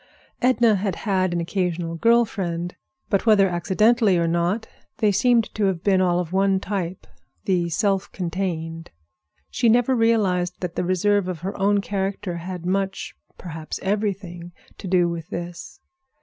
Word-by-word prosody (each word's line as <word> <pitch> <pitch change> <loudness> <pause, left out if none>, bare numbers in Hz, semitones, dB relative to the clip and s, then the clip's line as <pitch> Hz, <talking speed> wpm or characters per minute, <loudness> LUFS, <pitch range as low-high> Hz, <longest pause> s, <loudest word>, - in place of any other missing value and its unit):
Edna 240 -4 +4
had 195 -2 -2
had 185 -3 0
an 175 - -1
occasional 170 -1 -2
girl 230 +7 +4
friend, 175 -4 -4 0.4
but 200 +3 +1
whether 205 -3 +6
accidentally 200 +4 +3
or 170 0 +1
not, 175 +7 0 0.3
they 210 -2 +3
seemed 230 +3 +2
to 215 - 0
have 185 -4 -1
been 190 -2 +3
all 175 -1 +2
of 180 0 -4
one 195 0 +3
type—the 185 -1 -4
self 195 +1 0
contained. 165 -3 -4 0.6
She 235 - +2
never 245 +3 +3
realized 195 -6 +1
that 180 -2 -4
the - - -1
reserve 185 +2 +1
of 175 -4 -4
her 190 +3 -4
own 200 +1 +2
character 195 -2 -3
had 175 0 -6
much, 195 +1 -2 0.2
perhaps 160 -3 -6
everything, 190 -4 -3 0.3
to - - -7
do 180 -1 +3
with 170 0 -5
this. 175 -2 -7
190 Hz, 150 wpm, -23 LUFS, 175-205 Hz, 0.6 s, whether